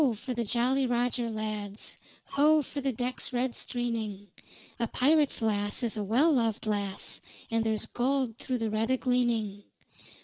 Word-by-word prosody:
for 250 Hz, +4 st, -5 dB
the 235 Hz, -1 st, -1 dB
Jolly 255 Hz, +4 st, +2 dB
Roger 245 Hz, 0 st, 0 dB
lads; 215 Hz, -2 st, -4 dB, 0.3 s
Ho! 300 Hz, +2 st, +4 dB
for 285 Hz, +1 st, -5 dB
the 270 Hz, 0 st, 0 dB
decks 250 Hz, +3 st, -3 dB
red 245 Hz, 0 st, 0 dB
streaming. 220 Hz, -5 st, -3 dB, 0.5 s
A 235 Hz, -, +1 dB
pirate's 290 Hz, +1 st, +3 dB
lass 205 Hz, 0 st, 0 dB
is 230 Hz, -2 st, 0 dB
a 210 Hz, -, -2 dB
well 250 Hz, +11 st, +4 dB
lov'd 230 Hz, -4 st, +1 dB
lass, 200 Hz, -2 st, -2 dB, 0.3 s
And 225 Hz, 0 st, +2 dB
there's 220 Hz, -1 st, 0 dB
gold 255 Hz, -2 st, 0 dB
through 255 Hz, -, -2 dB
the 225 Hz, -2 st, -1 dB
red 220 Hz, +2 st, 0 dB
a 260 Hz, -, +3 dB
gleaming! 235 Hz, -5 st, 0 dB
235 Hz, 160 wpm, -29 LUFS, 215-255 Hz, 0.5 s, Ho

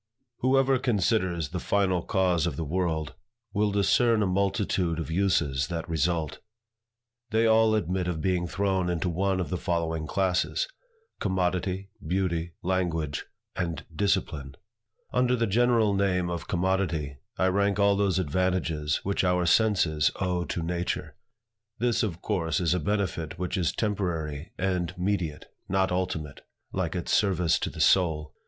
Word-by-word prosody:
WHOEVER 135 Hz, 0 st, +3 dB
considers 95 Hz, -, +1 dB
the 90 Hz, +3 st, -3 dB
final 95 Hz, -1 st, +1 dB
cause 90 Hz, -4 st, +1 dB
of -, -, -2 dB
the 85 Hz, -, -3 dB
world, 80 Hz, -2 st, -1 dB, 0.4 s
will 105 Hz, +1 st, +2 dB
discern 105 Hz, +2 st, +3 dB
a -, -, +2 dB
multitude 95 Hz, -2 st, 0 dB
of 80 Hz, -1 st, -4 dB
uses 80 Hz, -7 st, +1 dB
that 85 Hz, -2 st, -4 dB
result. 80 Hz, -1 st, -1 dB, 0.9 s
They 110 Hz, +1 st, +2 dB
all 110 Hz, -1 st, +5 dB
admit 90 Hz, -2 st, -1 dB
of 85 Hz, -3 st, -2 dB
being 90 Hz, +1 st, 0 dB
thrown 95 Hz, -1 st, 0 dB
into 85 Hz, 0 st, -1 dB
one 95 Hz, +2 st, 0 dB
of 90 Hz, -, -3 dB
the 90 Hz, -, -1 dB
following 80 Hz, -3 st, -1 dB
classes; 95 Hz, -, 0 dB, 0.5 s
Commodity; 95 Hz, 0 st, -1 dB
Beauty; 85 Hz, -1 st, -1 dB
Language; 85 Hz, -5 st, -1 dB, 0.3 s
and 85 Hz, -4 st, -3 dB
Discipline. 80 Hz, -7 st, -1 dB, 0.6 s
Under 125 Hz, 0 st, +3 dB
the 115 Hz, -1 st, +1 dB
general 115 Hz, 0 st, +3 dB
name 90 Hz, -3 st, +1 dB
of 85 Hz, 0 st, -4 dB
Commodity, 85 Hz, -6 st, 0 dB, 0.2 s
I -, -, +2 dB
rank 100 Hz, +1 st, +1 dB
all 100 Hz, 0 st, +4 dB
those 100 Hz, -3 st, +1 dB
advantages 85 Hz, -3 st, 0 dB
which 100 Hz, 0 st, 0 dB
our 90 Hz, -1 st, +2 dB
senses 85 Hz, -6 st, +3 dB
owe 90 Hz, -2 st, 0 dB
to 85 Hz, -, -3 dB
nature. 85 Hz, +1 st, -3 dB, 0.6 s
This, 120 Hz, -1 st, +1 dB
of 90 Hz, -7 st, -3 dB
course, 85 Hz, -7 st, 0 dB
is 85 Hz, -2 st, +2 dB
a 90 Hz, -, +1 dB
benefit 85 Hz, -3 st, -2 dB
which 90 Hz, +1 st, -2 dB
is 90 Hz, -6 st, +1 dB
temporary 85 Hz, -8 st, -2 dB
and 90 Hz, -3 st, -1 dB
mediate, 90 Hz, -5 st, -1 dB, 0.2 s
not 95 Hz, 0 st, +2 dB
ultimate, 90 Hz, -5 st, -3 dB, 0.3 s
like 95 Hz, -2 st, -1 dB
its 90 Hz, -, -2 dB
service 90 Hz, -5 st, +3 dB
to -, -, -2 dB
the -, -, -10 dB
soul. 80 Hz, -5 st, +3 dB
90 Hz, 145 wpm, -27 LUFS, 85-100 Hz, 0.9 s, all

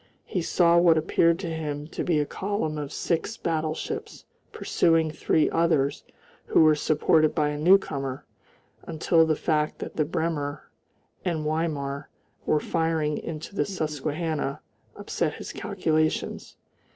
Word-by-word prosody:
He 180 Hz, -, -2 dB
saw 170 Hz, 0 st, +4 dB
what 170 Hz, -2 st, +5 dB
appeared 165 Hz, +1 st, +3 dB
to 170 Hz, -4 st, -3 dB
him 150 Hz, -2 st, -4 dB
to -, -, -4 dB
be 170 Hz, -4 st, +1 dB
a 150 Hz, -, +1 dB
column 185 Hz, -4 st, -3 dB
of 145 Hz, -1 st, -5 dB
six 170 Hz, +9 st, -2 dB
battleships 165 Hz, -, -3 dB, 0.3 s
pursuing 165 Hz, -2 st, +2 dB
three 155 Hz, 0 st, +2 dB
others 160 Hz, -4 st, +1 dB, 0.4 s
who -, -, +4 dB
were 155 Hz, -1 st, +6 dB
supported 155 Hz, +1 st, +2 dB
by 150 Hz, -2 st, +2 dB
a 150 Hz, -, -3 dB
newcomer, 145 Hz, -7 st, +2 dB, 0.6 s
until 160 Hz, +1 st, +2 dB
the 155 Hz, -, +2 dB
fact 150 Hz, -1 st, 0 dB
that -, -, -7 dB
the 155 Hz, -, +2 dB
Bremen 155 Hz, -2 st, -2 dB, 0.7 s
and 165 Hz, -4 st, -1 dB
Weimar 150 Hz, -3 st, -2 dB, 0.4 s
were 155 Hz, -, +3 dB
firing 160 Hz, -2 st, 0 dB
into 160 Hz, +4 st, -7 dB
the -, -, +2 dB
Susquehanna 155 Hz, -4 st, -3 dB, 0.3 s
upset -, -, -2 dB
his -, -, -8 dB
calculations. 155 Hz, 0 st, -1 dB
155 Hz, 135 wpm, -26 LUFS, 150-165 Hz, 0.7 s, were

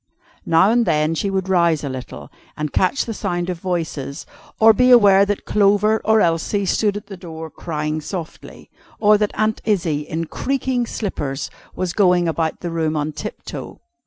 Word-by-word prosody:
Now 185 Hz, +5 st, +4 dB
and 235 Hz, -1 st, +2 dB
then 155 Hz, +1 st, +2 dB
she 195 Hz, +5 st, -1 dB
would 190 Hz, -1 st, -2 dB
rouse 170 Hz, -5 st, +2 dB
a -, -, -2 dB
little, 130 Hz, -2 st, -8 dB, 0.3 s
and 150 Hz, -1 st, -3 dB
catch 185 Hz, +9 st, +1 dB
the 230 Hz, -, -4 dB
sound 180 Hz, -3 st, -2 dB
of 175 Hz, -, -6 dB
voices, 165 Hz, -5 st, -4 dB, 0.3 s
or 220 Hz, 0 st, +7 dB
be 250 Hz, +3 st, +3 dB
aware 200 Hz, -5 st, +7 dB
that 205 Hz, 0 st, -2 dB
Clover 210 Hz, +1 st, +3 dB
or 220 Hz, 0 st, +4 dB
Elsie 170 Hz, +4 st, 0 dB
stood 205 Hz, +2 st, +1 dB
at 205 Hz, -, -8 dB
the 200 Hz, -1 st, -9 dB
door, 160 Hz, -3 st, -9 dB
crying 155 Hz, 0 st, -3 dB
softly; 165 Hz, +1 st, -8 dB, 0.3 s
or 210 Hz, 0 st, +5 dB
that 210 Hz, -1 st, +1 dB
Aunt 215 Hz, 0 st, 0 dB
Izzie, 175 Hz, -8 st, 0 dB
in 165 Hz, +1 st, -2 dB
creaking 260 Hz, -, -2 dB
slippers, 145 Hz, -12 st, -4 dB, 0.2 s
was 185 Hz, -2 st, -2 dB
going 180 Hz, -3 st, +3 dB
about 160 Hz, -1 st, -2 dB
the 175 Hz, -, -4 dB
room 160 Hz, -2 st, -1 dB
on 150 Hz, +1 st, -1 dB
tiptoe. 150 Hz, 0 st, -8 dB
180 Hz, 175 wpm, -20 LUFS, 160-210 Hz, 0.3 s, or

